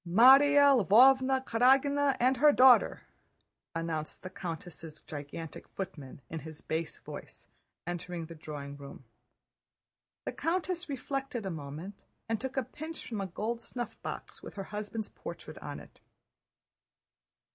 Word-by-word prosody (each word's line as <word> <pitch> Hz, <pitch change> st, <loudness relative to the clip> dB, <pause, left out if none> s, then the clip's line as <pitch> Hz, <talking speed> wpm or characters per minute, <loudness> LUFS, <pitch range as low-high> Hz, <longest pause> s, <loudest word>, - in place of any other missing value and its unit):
"Márya 270 Hz, +6 st, +7 dB
Lvóvna 260 Hz, +5 st, +5 dB
Karágina 275 Hz, +4 st, +3 dB
and 255 Hz, +2 st, +3 dB
her 295 Hz, +4 st, +7 dB
daughter!" 260 Hz, -2 st, +6 dB, 0.7 s
announced 165 Hz, -2 st, -4 dB
the 185 Hz, -, -7 dB
countess' 165 Hz, -3 st, -7 dB
gigantic 150 Hz, +2 st, -8 dB
footman 155 Hz, -9 st, -7 dB
in 160 Hz, -, -5 dB
his 155 Hz, 0 st, -10 dB
bass 160 Hz, +1 st, -3 dB
voice, -, -, -10 dB, 0.4 s
entering 175 Hz, -1 st, -4 dB
the 165 Hz, -, -9 dB
drawing 145 Hz, -3 st, -7 dB
room. 140 Hz, -1 st, -11 dB, 1.2 s
The -, -, -2 dB
countess 350 Hz, 0 st, -2 dB
reflected 270 Hz, -4 st, -3 dB
a 190 Hz, -, -2 dB
moment 160 Hz, +6 st, -7 dB, 0.2 s
and 225 Hz, -1 st, -1 dB
took 265 Hz, +1 st, -5 dB
a 265 Hz, -, +2 dB
pinch 315 Hz, +6 st, -8 dB
from 220 Hz, -4 st, -3 dB
a 195 Hz, -, -3 dB
gold 225 Hz, +6 st, -3 dB
snuffbox 240 Hz, +1 st, -7 dB
with -, -, -10 dB
her 195 Hz, -, -4 dB
husband's 210 Hz, +1 st, -4 dB
portrait -, -, -9 dB
on -, -, -6 dB
it. -, -, -16 dB
210 Hz, 130 wpm, -31 LUFS, 165-265 Hz, 1.2 s, Márya